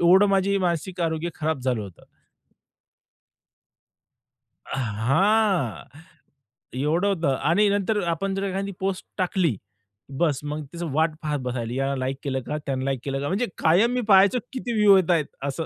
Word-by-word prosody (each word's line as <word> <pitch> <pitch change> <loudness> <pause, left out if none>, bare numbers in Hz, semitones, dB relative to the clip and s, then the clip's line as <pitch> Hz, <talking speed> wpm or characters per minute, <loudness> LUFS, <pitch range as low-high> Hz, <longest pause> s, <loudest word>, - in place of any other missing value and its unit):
एवढं 185 +4 +6
माझं 195 0 +2
मानसिक 175 0 -2
आरोग्य 165 0 -1
खराब 155 -2 -2
झालं 125 -4 0
होतं. 95 -4 -12 2.7
अ, - - -2
हां, 135 - +1 1.0
एवढं 160 +8 +1
होतं. 165 -9 +1
आणि 200 +7 +2
नंतर 205 +1 0
आपण 195 +4 -3
जर 195 - -2
एखादी 195 +1 -2
पोस्ट 190 -1 -2
टाकली 180 - +1 0.7
बस, 150 -6 +2
मग 150 +1 -4
तिचं 170 -2 -4
वाट 160 +2 +2
पाहत 150 -2 -2
बसायला. 120 -2 -3
यानं 135 +1 -1
लाइक 130 +1 -2
केलं 135 -2 -2
का, 150 - -2
त्यानं 130 -1 -2
लाइक 135 -2 -1
केलं 135 -1 -2
का? 140 - -2
म्हणजे 200 +10 0
कायम 185 +9 +3
मी 250 0 0
पाहायचो 200 +5 +6
किती 250 -2 -4
व्ह्यू 210 -2 +6
येतायत 170 -4 +2 0.2
असं. 140 +4 -3
165 Hz, 155 wpm, -24 LUFS, 140-195 Hz, 2.7 s, एवढं